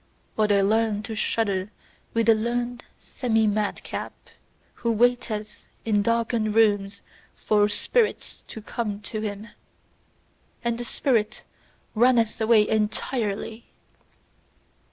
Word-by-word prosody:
Or 215 -1 +2
they 200 -1 +3
learn 215 0 +1
to 220 -1 -5
shudder 205 -3 0 0.5
with 230 0 +2
a 225 - +8
learned 240 +2 -2
semi 225 -3 0
madcap, 210 0 -2 0.7
who 235 - +1
waiteth 225 -2 0 0.2
in 210 -2 +2
darkened 230 -1 0
rooms 205 -3 +2 0.3
for 210 -1 +2
spirits 440 - 0
to 220 - -9
come 210 -3 -3
to 215 +1 -4
him 210 +1 -5 1.1
and 235 -1 -1
the 240 - -4
spirit 225 -4 0 0.5
runneth 230 -1 +3
away 220 -1 +5
entirely! 220 0 -2
220 Hz, 110 wpm, -25 LUFS, 210-235 Hz, 1.1 s, a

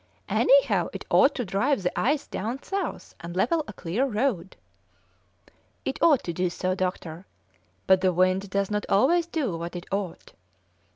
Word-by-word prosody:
"Anyhow - - +3
it - - -7
ought 280 - +5
to 245 - -2
drive 200 +5 0
the 180 - +1
ice 290 +4 +1
down 235 +7 -5
south, 390 -4 -4
and 170 +1 -8
level 305 - +1
a 215 - -8
clear 180 +8 -2
road." 215 -6 -1 1.3
"It - - -3
ought 315 -6 +4
to 170 - -4
do 180 +2 0
so, 185 +1 -2
doctor, 180 -2 -4 0.6
but 190 -1 +4
the 185 -1 +3
wind 185 +2 +1
does 200 +1 -1
not 210 0 -2
always 325 - +3
do 285 - -2
what 170 +2 -6
it 175 - -6
ought. 195 -3 -4
195 Hz, 165 wpm, -26 LUFS, 185-270 Hz, 1.3 s, ought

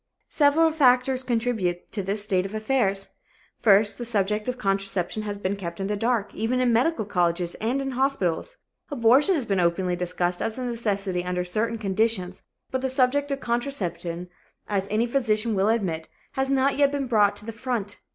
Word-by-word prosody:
Several 315 +2 +4
factors 255 -3 +3
contribute 225 -8 -1
to 210 - -2
this 200 +2 0
state 190 -3 +1
of 195 +3 -6
affairs. 215 -4 +2 0.5
First, 205 0 +4
the - - -3
subject 210 -1 -1
of 250 - -3
contraception 195 -2 -1
has 205 -1 -4
been 200 0 -2
kept 175 -2 -6
in 195 - -2
the 210 +1 -1
dark, 225 -1 0
even 230 +4 -1
in 250 -2 +2
medical 245 0 +1
colleges 175 -2 0
and 240 +5 0
in 270 0 -3
hospitals. 265 - -1 0.3
Abortion 270 +6 +4
has 280 -7 -1
been 195 -3 0
openly 180 +1 +1
discussed 175 0 -2
as 225 +1 -1
a 255 - -3
necessity 200 -6 -2
under 180 0 -2
certain 220 +6 -1
conditions, 195 -2 -1 0.3
but 260 - -1
the 265 - -1
subject 265 +2 +2
of 275 -1 -3
contraception, 180 -9 -3 0.4
as 195 -2 -1
any 215 +3 +1
physician 235 -3 0
will 195 +1 +2
admit, 180 -8 -1 0.2
has 265 0 -1
not 275 0 +2
yet 280 -1 +4
been 285 -1 -2
brought 210 -5 +3
to 210 - -9
the 230 - -4
front. 225 -3 -4
215 Hz, 180 wpm, -25 LUFS, 195-255 Hz, 0.5 s, Several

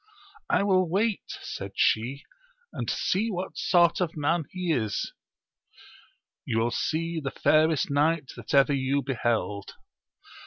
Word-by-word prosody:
I - - +3
will 185 -3 +2
wait, 205 +4 +1 0.2
said - - -6
she, 125 +6 +1 0.5
and - - -4
see 210 +5 0
what 190 -2 -4
sort 175 -1 +3
of 165 -3 -2
man 155 +2 +1
he 180 -2 -2
is. 110 -7 -2 0.6
— - - -24
You 110 - 0
will 115 +1 +1
see 165 +4 -1
the 140 -3 -3
fairest 155 +1 +2
knight 150 0 +1
that - - -4
ever 140 +1 +5
you 135 +1 0
beheld. 115 -6 -2
155 Hz, 140 wpm, -27 LUFS, 135-175 Hz, 0.6 s, ever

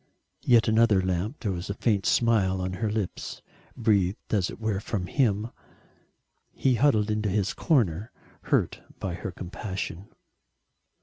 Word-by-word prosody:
Yet 120 -2 +5
another 110 -2 +4
lamp, 95 - -2
there 105 - -1
was 90 0 -5
a 100 - -2
faint 105 -4 +1
smile 105 -6 +3
on 95 0 -2
her 110 +3 -1
lips 105 -3 -4 0.3
breathed 105 -4 +1
as 100 -4 +2
it - - -9
were 110 -3 -1
from 100 -2 -3
him. 110 -1 +1 1.0
He 130 - +2
huddled 110 -4 +3
into 105 0 0
his 100 0 0
corner, 110 - +1 0.3
hurt - - +1 0.2
by 95 - -3
her 85 - -5
compassion. 95 0 -6
105 Hz, 140 wpm, -27 LUFS, 95-115 Hz, 1.0 s, Yet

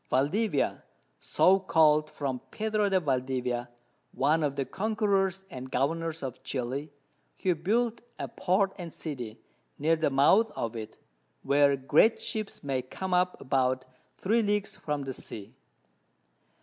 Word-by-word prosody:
Valdivia, 170 - +1 0.4
so 190 +1 +4
called 155 -4 +4
from 140 -4 -3
Pedro 215 -1 0
de 190 -1 +3
Valdivia, 125 -4 -1 0.4
one 150 +4 +2
of 145 -2 0
the 135 - -1
Conquerors 195 - 0
and 130 -2 -7
Governors 165 +5 -1
of 130 -1 -5
Chili, 135 +3 -3 0.5
who 185 - +3
built 220 +8 0 0.2
a - - -4
Port 190 +1 +1
and 170 -2 -6
City, 125 -10 -6 0.4
near 160 +3 +3
the 160 -2 +1
Mouth 145 +12 +5
of 115 0 -3
it, 110 -1 -7 0.5
where 140 0 +4
great 150 - +4
Ships 215 -3 -4
may 135 -2 -1
come 180 +9 -5
up 180 0 +2
about 130 -1 0 0.3
3 225 +5 +2
Leagues 205 -1 0
from 150 -2 -3
the 135 -1 -4
Sea. 105 -4 -9
155 Hz, 135 wpm, -29 LUFS, 130-190 Hz, 0.5 s, Mouth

